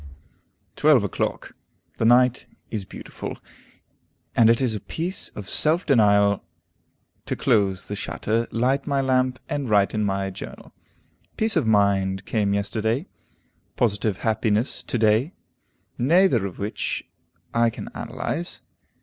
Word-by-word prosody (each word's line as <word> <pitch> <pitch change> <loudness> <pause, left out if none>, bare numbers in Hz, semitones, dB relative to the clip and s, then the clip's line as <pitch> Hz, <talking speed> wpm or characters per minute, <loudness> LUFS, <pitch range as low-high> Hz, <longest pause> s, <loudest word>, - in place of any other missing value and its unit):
12 145 -7 +5
o'clock. 100 - -3 0.5
The - - +1
night 125 +1 +4 0.2
is 105 -4 -3
beautiful, - - -8 1.0
and 115 -1 +6
it 115 - +4
is 125 -4 0
a 105 - -3
piece 175 - -3
of 105 -2 -7
self 160 - +1
denial 100 -6 +4 0.8
to - - -1
close 95 -3 +1
the 105 - -5
shutter, 110 +7 -2
light 130 +4 0
my 140 -1 +1
lamp, 130 -1 +1
and 140 -4 -3
write 100 -2 +3
in 110 -1 0
my 95 -1 -1
journal. 95 - -10 0.6
Peace 220 0 +2
of 155 -9 +2
mind 100 -2 +2
came 100 -3 0
yesterday, 110 - -1 0.7
positive 105 -3 0
happiness 110 +1 0
to - - -3
day, 110 - +2 0.7
neither 135 - +4
of 90 - -10
which 105 +1 -3 0.5
I 115 0 +3
can - - -8
analyze. 175 +2 -5
110 Hz, 130 wpm, -24 LUFS, 100-130 Hz, 1.0 s, and